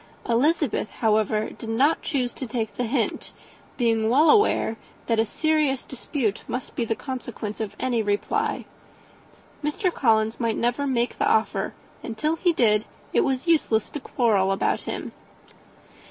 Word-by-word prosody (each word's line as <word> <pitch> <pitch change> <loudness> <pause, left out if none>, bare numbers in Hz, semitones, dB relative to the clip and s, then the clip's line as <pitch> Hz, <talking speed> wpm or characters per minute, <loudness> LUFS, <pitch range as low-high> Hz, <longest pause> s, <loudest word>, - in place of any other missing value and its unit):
Elizabeth, 275 0 +1
however, 215 -1 +1
did 225 - -9
not 270 +8 +2
choose 250 -4 -1
to 260 - -6
take 225 -1 -3
the 245 - -2
hint, 235 0 -1 0.5
being 225 -3 +2
well 295 +6 +6
aware 415 - +3 0.3
that 230 -1 +1
a 225 - +3
serious 305 +1 0
dispute 245 -4 -2
must 250 +2 -5
be 240 - 0
the 225 -1 -1
consequence 240 -5 -6
of 215 - -4
any 245 -3 +1
reply. 205 -1 -1 1.0
Mr. 340 +5 0
Collins 220 -3 +2
might 230 -2 0
never 245 +4 0
make 245 -2 0
the - - +2
offer, 220 - +1 0.3
and, 225 -2 -6
till 310 +6 +1
he 350 +2 +2
did, 215 -8 +3 0.3
it - - +4
was 265 0 0
useless 295 -10 +2
to 295 - -4
quarrel 215 -8 +1
about 195 - 0
him. - - -4
240 Hz, 155 wpm, -25 LUFS, 220-280 Hz, 1.0 s, well